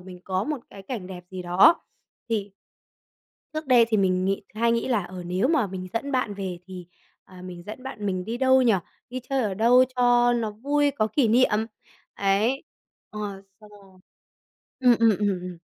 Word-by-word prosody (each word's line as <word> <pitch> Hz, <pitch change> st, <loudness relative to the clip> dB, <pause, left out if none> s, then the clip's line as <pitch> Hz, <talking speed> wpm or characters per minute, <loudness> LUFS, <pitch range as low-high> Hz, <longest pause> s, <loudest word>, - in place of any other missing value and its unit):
mình 180 Hz, 0 st, -12 dB
có 190 Hz, +1 st, -1 dB
một 300 Hz, -1 st, -2 dB
cái 195 Hz, -, -11 dB
cảnh 210 Hz, -4 st, -6 dB
đẹp 180 Hz, -1 st, -9 dB
gì 185 Hz, -1 st, -6 dB
đó 180 Hz, -, +5 dB, 0.5 s
thì 205 Hz, -3 st, -2 dB, 1.0 s
trước 310 Hz, 0 st, -4 dB
đây 250 Hz, -3 st, +6 dB
thì 220 Hz, -, +2 dB
mình 185 Hz, -2 st, +1 dB
nghĩ 195 Hz, +2 st, -1 dB
hay 230 Hz, +2 st, +2 dB
nghĩ 230 Hz, +1 st, -1 dB
là, 230 Hz, -6 st, +1 dB
ờ, 180 Hz, 0 st, -8 dB
nếu 185 Hz, +8 st, 0 dB
mà 300 Hz, -8 st, +2 dB
mình 185 Hz, -1 st, -6 dB
dẫn 280 Hz, +5 st, -3 dB
bạn 250 Hz, -5 st, 0 dB
về 190 Hz, -3 st, -5 dB
thì, 185 Hz, -2 st, -9 dB, 0.4 s
ờ, 185 Hz, -1 st, -14 dB
mình 180 Hz, -1 st, -9 dB
dẫn 215 Hz, +4 st, -8 dB
bạn 235 Hz, -6 st, -6 dB
mình 185 Hz, -2 st, -2 dB
đi 225 Hz, +4 st, -4 dB
đâu 260 Hz, +1 st, +4 dB
nhỉ? 240 Hz, -3 st, +4 dB, 0.4 s
Đi 255 Hz, -, -4 dB
chơi 265 Hz, +1 st, -1 dB
ở 205 Hz, -4 st, -1 dB
đâu 240 Hz, +5 st, +5 dB
cho 245 Hz, 0 st, +4 dB
nó 230 Hz, -3 st, -1 dB
vui, 285 Hz, +7 st, +1 dB
có 240 Hz, -6 st, 0 dB
kỷ 230 Hz, +2 st, +1 dB
niệm. 225 Hz, -2 st, +3 dB, 0.5 s
Ấy. 205 Hz, +7 st, +1 dB, 0.5 s
Ờ, 215 Hz, -, -8 dB, 0.4 s
xong 210 Hz, -1 st, -16 dB
rồi 195 Hz, -3 st, -18 dB, 0.8 s
ừm, 250 Hz, -2 st, +5 dB
ừm, 230 Hz, -1 st, +5 dB
ừm, 205 Hz, -, +1 dB
ừm. 180 Hz, -1 st, -8 dB
215 Hz, 195 wpm, -25 LUFS, 190-250 Hz, 1.0 s, đây